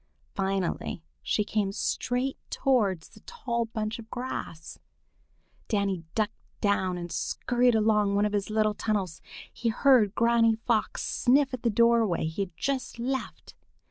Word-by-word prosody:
Finally 190 -3 -2 0.2
she 210 - +1
came 205 -2 -1
straight 250 +6 -1
towards 205 -11 +1
the - - -17
tall 235 - -3
bunch 220 0 -4
of 225 -1 -11
grass. 245 -10 -6 0.9
Danny 200 -5 0
ducked 215 -1 +1 0.3
down 190 -3 +1
and 175 -1 -6
scurried 245 -1 +1
along 210 -2 +3
one 205 +1 +3
of 210 - -1
his 205 0 -1
little 215 0 +2
tunnels. 200 -6 -2 0.3
He 235 - -1
heard 225 -3 +4
Granny 230 -1 +4
Fox 225 -1 -1
sniff 270 +2 +2
at 255 - -4
the 235 - +2
doorway 230 -6 +3
he 160 +5 -3
had 180 -4 -5
just 270 +4 -2
left. 260 +3 -4
215 Hz, 140 wpm, -28 LUFS, 200-240 Hz, 0.9 s, heard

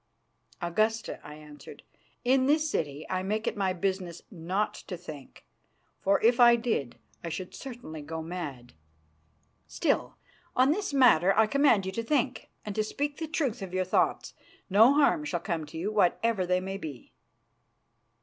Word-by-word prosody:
"Augusta," 215 +6 0
I 150 - -10
answered, 150 -1 -13 0.4
"in 260 +1 +3
this 310 +2 +3
city 150 - -3
I 185 0 -1
make 215 +4 -2
it - - -1
my 195 -2 0
business 185 -2 -3
not 185 +3 -2
to 180 - -8
think, 155 -6 -11 0.5
for 195 +1 +2
if 235 +2 +4
I 240 -1 +8
did 225 - -2 0.3
I 170 - -4
should 180 +3 -6
certainly 235 - -8
go 160 +2 -6
mad." 150 -8 -6 0.9
"Still, - - -1 0.4
on 260 +3 +4
this 395 +2 -1
matter 210 - +5
I 220 - +6
command 255 -5 +3
you 190 - -3
to 230 - -3
think, 265 0 -1 0.2
and 210 - -4
to 215 - 0
speak 285 +6 -3
the 320 - -4
truth 280 -8 -1
of 185 -1 -6
your 185 0 +1
thoughts. 185 - 0 0.4
No 225 +8 +6
harm 300 +1 +3
shall 185 -12 -2
come 170 -4 -3
to 155 - -9
you, 190 +6 -2
whatever 210 0 +1
they 180 0 +2
may 190 +1 -5
be." 150 -9 -9
195 Hz, 165 wpm, -28 LUFS, 170-245 Hz, 0.9 s, I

